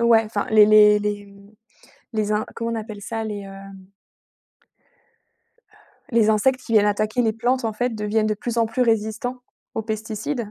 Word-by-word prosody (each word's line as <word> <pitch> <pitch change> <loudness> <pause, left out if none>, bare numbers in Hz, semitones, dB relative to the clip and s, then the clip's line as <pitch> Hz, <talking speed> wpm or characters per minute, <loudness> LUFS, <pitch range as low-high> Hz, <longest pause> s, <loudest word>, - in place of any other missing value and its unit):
Ouais, 235 -1 +5
enfin 215 -2 -3
les 215 -1 +7
les 210 0 +6
les, 205 0 -3
mmh, 200 +1 -18 0.6
les 215 -1 -1
in 210 0 0
comment 230 0 -3
on - - -2
appelle 215 -2 -7
ça? 225 +2 -4
Les, 205 -2 -5
heu - - -10 2.6
les 230 -3 +3
insectes 255 +5 +2
qui 235 - -7
viennent 215 -2 +5
attaquer 215 +3 0
les 220 -2 +1
plantes, 245 +3 -1
en 225 - -1
fait, 245 +4 -1
deviennent 215 0 0
de 215 - 0
plus 235 +3 -4
en 230 - +3
plus 225 +3 -1
résistants 225 +2 -1 0.4
aux - - -1
pesticides. 220 +2 -4
220 Hz, 175 wpm, -22 LUFS, 210-230 Hz, 2.6 s, les